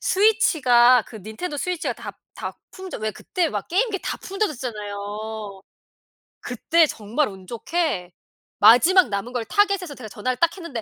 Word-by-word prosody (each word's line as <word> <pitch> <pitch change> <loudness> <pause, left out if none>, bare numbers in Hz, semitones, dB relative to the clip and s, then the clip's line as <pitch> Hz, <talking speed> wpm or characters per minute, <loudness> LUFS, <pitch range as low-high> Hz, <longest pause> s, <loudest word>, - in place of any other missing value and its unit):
스위치가 260 - +4
그 225 - -11
닌텐도 220 - -6
스위치가 355 +3 -2
다 - - -8 0.2
다 - - -6 0.2
품절 375 - -8
왜 215 0 -1
그때 350 - -2
막 205 -7 -4
게임기 400 +3 +1
다 - - -3
품절됐었잖아요. 215 - -5 0.8
그때 320 +7 +2
정말 230 +5 -1
운 190 -2 -12
좋게 235 - -2 0.5
마지막 320 - +6
남은 205 +4 -4
걸 245 -2 -1
타겟에서 395 - +1
제가 250 -4 -9
전화를 245 +5 -3
딱 335 +5 +2
했는데 335 -11 -6
250 Hz, 315 characters per minute, -23 LUFS, 215-360 Hz, 0.8 s, 마지막